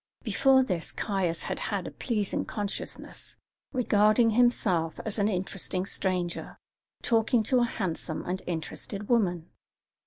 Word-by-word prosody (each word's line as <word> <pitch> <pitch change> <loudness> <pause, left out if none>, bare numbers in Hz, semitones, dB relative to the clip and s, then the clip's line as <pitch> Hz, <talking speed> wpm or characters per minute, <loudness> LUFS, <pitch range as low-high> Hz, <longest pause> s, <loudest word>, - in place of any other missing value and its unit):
Before 265 -1 +4
this 180 -9 -2
Caius 185 -5 -1
had - - -3
had - - -2
a - - -5
pleasing 215 -6 -1
consciousness, 205 -2 -5 0.3
regarding 225 -2 +4
himself 210 -9 +2
as 220 0 -2
an 200 - +3
interesting 185 -1 -1
stranger 180 -3 -1 0.5
talking 225 0 +3
to 255 +3 +3
a 240 - +4
handsome 175 -7 -3
and 185 +1 -2
interested 180 +4 -4
woman. 180 -8 +1
200 Hz, 125 wpm, -28 LUFS, 180-230 Hz, 0.5 s, Before